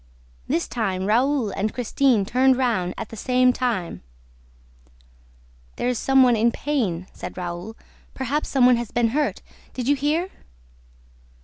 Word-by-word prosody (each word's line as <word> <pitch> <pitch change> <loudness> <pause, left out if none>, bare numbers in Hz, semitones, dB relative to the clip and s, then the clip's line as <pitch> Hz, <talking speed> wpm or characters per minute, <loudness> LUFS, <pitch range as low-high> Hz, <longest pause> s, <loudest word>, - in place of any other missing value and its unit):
This 170 - 0
time, 190 -6 -2
Raoul 245 +1 +1
and 210 +3 -3
Christine 245 -2 +1
turned 260 +4 +3
round 225 -9 0
at 220 - -6
the - - -9
same 250 +3 +2
time: 235 -10 -2 1.7
"There 245 - -1
is 250 - -1
some 270 -1 +4
one 245 -2 +4
in 230 +2 +2
pain," 225 - -2
said - - -8
Raoul. 180 +4 -6 0.4
"Perhaps 270 +3 -2
some 265 -3 +3
one 250 -1 +5
has 235 -2 -4
been 235 -1 +1
hurt. 295 +5 -1 0.3
Did 250 -1 -3
you 285 - +4
hear?" 305 +7 -1
245 Hz, 145 wpm, -23 LUFS, 210-265 Hz, 1.7 s, one